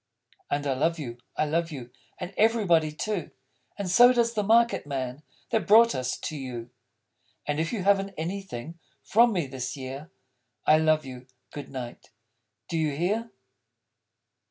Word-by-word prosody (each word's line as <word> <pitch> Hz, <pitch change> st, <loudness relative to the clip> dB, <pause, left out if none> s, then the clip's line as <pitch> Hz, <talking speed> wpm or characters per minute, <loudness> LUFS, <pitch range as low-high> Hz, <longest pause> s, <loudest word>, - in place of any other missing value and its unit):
_ -, -, -36 dB
And 145 Hz, 0 st, -1 dB
I 140 Hz, -, +1 dB
love 160 Hz, +6 st, +1 dB
you, 120 Hz, -6 st, -6 dB, 0.2 s
I -, -, +2 dB
love 165 Hz, +2 st, -1 dB
you; 125 Hz, -5 st, -8 dB, 0.3 s
And 180 Hz, +2 st, -6 dB
everybody, 200 Hz, -8 st, +3 dB
too. 185 Hz, +2 st, -3 dB, 0.5 s
And 200 Hz, -2 st, -3 dB
so 240 Hz, +7 st, +7 dB
does 235 Hz, -2 st, +2 dB
the 215 Hz, -, 0 dB
market 230 Hz, -4 st, +3 dB
man 130 Hz, -1 st, -4 dB, 0.3 s
That 215 Hz, -7 st, 0 dB
brought 230 Hz, +3 st, +7 dB
us 130 Hz, 0 st, -2 dB
you! 125 Hz, -5 st, -6 dB, 0.7 s
And 150 Hz, 0 st, -1 dB
if 165 Hz, +1 st, -1 dB
you 215 Hz, -6 st, -2 dB
haven't 195 Hz, 0 st, +2 dB
Anything 170 Hz, -3 st, -5 dB, 0.2 s
For 235 Hz, +3 st, +5 dB
me, 185 Hz, -9 st, 0 dB
this 130 Hz, +1 st, -5 dB
year, 135 Hz, +4 st, -7 dB, 0.6 s
_I 155 Hz, +1 st, +6 dB
love 155 Hz, -1 st, +3 dB
you. 125 Hz, -1 st, -9 dB, 0.2 s
Good 145 Hz, -2 st, -8 dB
night! 125 Hz, -3 st, -8 dB, 0.6 s
Do 165 Hz, -2 st, -2 dB
you 150 Hz, -3 st, 0 dB
hear? 210 Hz, +9 st, -1 dB
160 Hz, 155 wpm, -27 LUFS, 135-200 Hz, 0.7 s, so